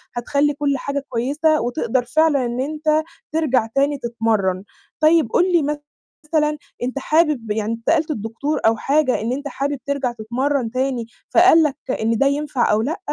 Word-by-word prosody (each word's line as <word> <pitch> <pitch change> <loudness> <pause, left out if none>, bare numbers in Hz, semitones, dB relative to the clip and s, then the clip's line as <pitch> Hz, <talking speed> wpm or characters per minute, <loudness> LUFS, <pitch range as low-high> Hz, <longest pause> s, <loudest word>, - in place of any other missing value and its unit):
هتخلّي 280 +4 +1
كلّ 280 -1 0
حاجة 280 +1 -3
كويسة، 295 +6 +1
وتقدر 245 0 -1
فعلًا 290 0 +2
إن 240 +1 -3
أنت 310 +2 0 0.3
ترجع 270 -8 +1
تاني 280 +1 +2
تتمرّن، 220 -6 -1 0.4
طيب 310 -4 +4
قُل 365 +1 +2
لي 340 - +4 0.6
مثلًا، 300 -1 +1 0.3
أنت 255 +3 -2
حابب 300 -7 +1
يعني 220 +1 -1
أنت 230 0 -4
سألت 320 -1 +2
الدكتور 235 +5 -3
أو 225 0 +4
حاجة 275 -1 +1
إن 230 +2 -2
أنت 285 +2 -4
حابب 280 0 -3
ترجع 280 -3 -1
تتمرّن 240 +2 -2
تاني، 255 -2 -1 0.2
فقال 345 -2 +6
لك 290 -3 0 0.3
إن 225 +1 +1
ده 275 - +3
ينفع 280 -5 0
أو 215 +1 +2
لأ؟ 305 +9 -2
275 Hz, 165 wpm, -20 LUFS, 235-300 Hz, 0.6 s, فقال